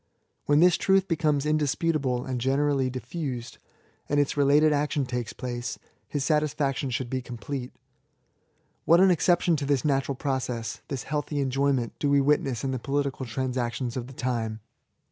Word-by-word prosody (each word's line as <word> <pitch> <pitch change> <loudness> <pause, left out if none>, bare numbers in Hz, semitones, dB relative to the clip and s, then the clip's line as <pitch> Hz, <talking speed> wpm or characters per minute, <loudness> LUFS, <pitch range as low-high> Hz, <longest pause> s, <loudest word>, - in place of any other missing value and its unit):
When 145 +1 +4
this 180 -1 +6
truth 195 0 +3
becomes 150 -4 +1
indisputable 150 -3 0
and 130 -2 -3
generally 135 0 +1
diffiised^ 130 -1 -5 0.5
and 145 - +2
its 145 - +1
related 145 +2 +4
action 145 -1 0
takes 125 -3 -3
place, 120 0 -5 0.3
his 145 -2 -2
satisfaction 145 -3 0
should 125 0 -2
be 130 +1 -2
complete. 125 +1 -6 1.1
What 170 +1 +6
an 190 0 +6
exception 175 +1 +3
to 140 - -3
this 140 -2 +1
natural 135 -1 +1
process, 125 -4 -3
this 135 -3 -4
healthy 150 0 -3
enjojrment, 135 -3 +1
do 145 - +1
we 140 0 +4
witness 135 -4 +1
in 135 - -1
the 130 - -2
political 140 0 -2
transactions 125 0 -2
of 125 -2 -4
the 135 - -11
time 115 -4 -2
135 Hz, 155 wpm, -27 LUFS, 125-150 Hz, 1.1 s, this